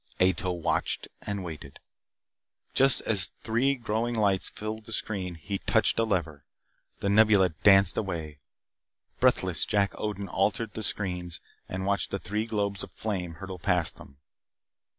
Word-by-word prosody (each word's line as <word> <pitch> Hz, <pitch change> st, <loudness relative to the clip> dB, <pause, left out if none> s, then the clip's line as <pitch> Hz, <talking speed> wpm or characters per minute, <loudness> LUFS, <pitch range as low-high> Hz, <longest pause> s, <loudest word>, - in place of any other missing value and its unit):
Ato 95 Hz, +1 st, +3 dB
watched 85 Hz, -2 st, -1 dB, 0.2 s
and 100 Hz, -2 st, -2 dB
waited. 75 Hz, -5 st, -8 dB, 1.0 s
Just 135 Hz, -1 st, +6 dB
as 100 Hz, -4 st, +3 dB
the -, -, -22 dB
three 125 Hz, +5 st, +2 dB
growing 115 Hz, 0 st, -2 dB
lights 100 Hz, -4 st, +1 dB
filled 110 Hz, +1 st, -6 dB
the 115 Hz, -, -10 dB
screen 95 Hz, -5 st, -2 dB
he 95 Hz, +4 st, -4 dB
touched -, -, +2 dB
a -, -, +4 dB
lever. 85 Hz, -9 st, -1 dB, 0.6 s
The 100 Hz, -, 0 dB
Nebula 105 Hz, -2 st, +5 dB
danced 95 Hz, +2 st, +4 dB
away. 80 Hz, -7 st, -4 dB, 0.8 s
Breathless, -, -, +3 dB
Jack 100 Hz, -1 st, +1 dB
Odin 100 Hz, -2 st, -3 dB
altered 105 Hz, +4 st, 0 dB
the 110 Hz, -, -5 dB
screens 90 Hz, -5 st, -3 dB, 0.3 s
and 95 Hz, +1 st, -3 dB
watched 100 Hz, 0 st, 0 dB
the -, -, -2 dB
three 105 Hz, +3 st, -3 dB
globes 100 Hz, -2 st, -1 dB
of -, -, -7 dB
flame 90 Hz, -6 st, -3 dB
hurtle 95 Hz, +2 st, -8 dB
past 90 Hz, -3 st, +1 dB
them. 70 Hz, -, -14 dB
100 Hz, 150 wpm, -28 LUFS, 90-110 Hz, 1.0 s, Just